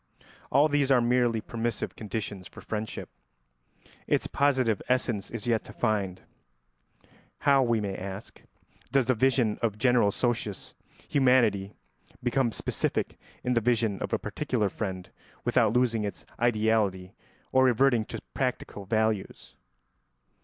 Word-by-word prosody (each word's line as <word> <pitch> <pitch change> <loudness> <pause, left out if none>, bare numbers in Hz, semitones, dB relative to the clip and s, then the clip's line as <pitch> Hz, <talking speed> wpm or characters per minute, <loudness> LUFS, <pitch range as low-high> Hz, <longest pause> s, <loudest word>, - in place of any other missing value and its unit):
] - - -25
All 140 +3 +5
these 145 -2 +1
are 130 -2 +5
merely 120 -1 +2
permissive 115 +1 -3
conditions 105 -3 -5
for - - -13
friendship; 110 0 -5 1.0
its - - +1
positive 130 -7 +1
essence 120 -5 0
is 115 -3 -6
yet 115 -2 +1
to - - -10
find. 100 -4 -1 1.2
How, 140 -1 +5
we 120 -3 +2
may 100 -2 -3
ask, 95 +3 -8 0.5
does 135 -2 +3
the 130 - +3
vision 125 -2 +2
of 115 -3 +1
the - - -19
general 120 -2 +4
socius, 110 -3 -2 0.3
humanity, 120 -8 +3 0.5
become 125 0 +1
specific - - -2 0.2
in 125 - +1
the 115 - +2
vision 110 -3 +1
of - - -3
a - - +2
particular 105 -2 -1
friend 95 -3 -5 0.3
without - - +3
losing 120 -3 +2
its 100 - -5
ideality 110 -5 +1 0.4
or 130 0 +4
reverting 125 -1 +3
to - - -7
practical 125 -6 -3
values? 110 -1 -1
115 Hz, 135 wpm, -28 LUFS, 105-125 Hz, 1.2 s, All